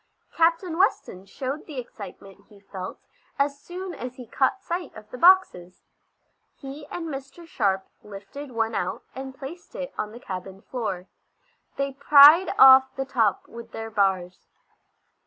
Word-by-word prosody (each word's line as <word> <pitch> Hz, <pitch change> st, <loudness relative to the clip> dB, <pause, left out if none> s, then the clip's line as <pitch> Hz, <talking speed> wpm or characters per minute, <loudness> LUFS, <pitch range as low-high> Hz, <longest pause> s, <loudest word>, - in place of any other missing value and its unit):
Captain 335 Hz, +1 st, +1 dB
Weston 195 Hz, -, 0 dB
showed 265 Hz, +8 st, -5 dB
the 295 Hz, -, -9 dB
excitement 200 Hz, -4 st, -10 dB
he 205 Hz, -2 st, -18 dB
felt 190 Hz, -2 st, -8 dB, 0.4 s
as 280 Hz, 0 st, 0 dB
soon 365 Hz, +2 st, -7 dB
as 250 Hz, -4 st, -7 dB
he 255 Hz, -2 st, -10 dB
caught 270 Hz, -, 0 dB
sight 350 Hz, +1 st, -4 dB
of 215 Hz, -1 st, -12 dB
the 250 Hz, -, -7 dB
boxes. 340 Hz, -, +3 dB, 0.7 s
He 280 Hz, +1 st, -10 dB
and 335 Hz, -1 st, -6 dB
Mr. 275 Hz, +3 st, -8 dB
Sharp 195 Hz, -11 st, -1 dB, 0.2 s
lifted 210 Hz, +8 st, -10 dB
one 225 Hz, -1 st, -1 dB
out, 180 Hz, -, -3 dB
and 265 Hz, 0 st, -8 dB
placed 320 Hz, -, -10 dB
it -, -, -6 dB
on 210 Hz, -, -3 dB
the 235 Hz, -, -11 dB
cabin 190 Hz, -1 st, -8 dB
floor. 195 Hz, -8 st, -4 dB, 0.7 s
They 275 Hz, 0 st, -2 dB
pried 295 Hz, +6 st, +7 dB
off 265 Hz, 0 st, +8 dB
the 270 Hz, -, -3 dB
top 230 Hz, -7 st, 0 dB
with 230 Hz, 0 st, -11 dB
their 225 Hz, 0 st, -6 dB
bars. 190 Hz, -3 st, -1 dB
260 Hz, 150 wpm, -25 LUFS, 200-300 Hz, 0.7 s, off